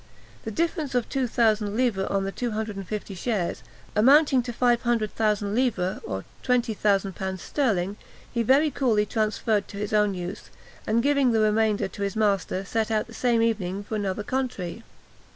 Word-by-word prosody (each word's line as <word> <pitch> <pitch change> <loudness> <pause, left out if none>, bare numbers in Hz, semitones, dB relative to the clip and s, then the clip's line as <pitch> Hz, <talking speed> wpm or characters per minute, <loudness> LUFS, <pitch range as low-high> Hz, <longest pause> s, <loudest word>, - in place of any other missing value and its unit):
The - - -2
difference 310 - -1
of 245 -2 +1
two 265 -2 0
thousand 215 -3 +1
livres 230 -7 +1
on 195 -1 0
the 195 - -2
two 245 +4 -3
hundred 215 -1 -3
and 195 -2 -7
fifty 210 -2 -5
shares, 190 -1 -2 0.3
amounting 270 +4 +5
to 240 0 -5
500,000 225 -4 +1
livres, 210 -7 0
or 95 0 -5 0.2
20,000l. 200 -6 0
sterling, 205 -6 -1 0.4
he 235 - +1
very 275 +6 +4
coolly 230 -6 +2
transferred 215 -1 0
to 200 - -9
his 210 +1 -3
own 210 -2 +3
use, 180 +3 -6 0.4
and 230 +2 +2
giving 280 -3 +3
the 220 - +3
remainder 215 -1 +2
to 190 - -10
his 200 -1 -1
master, 195 -3 0
set 220 +2 -1
out 215 -1 +1
the 230 - -14
same 235 -1 +2
evening 200 -4 -1
for 205 - -8
another 205 -1 -2
country. 230 -6 -3
215 Hz, 170 wpm, -25 LUFS, 200-240 Hz, 0.4 s, amounting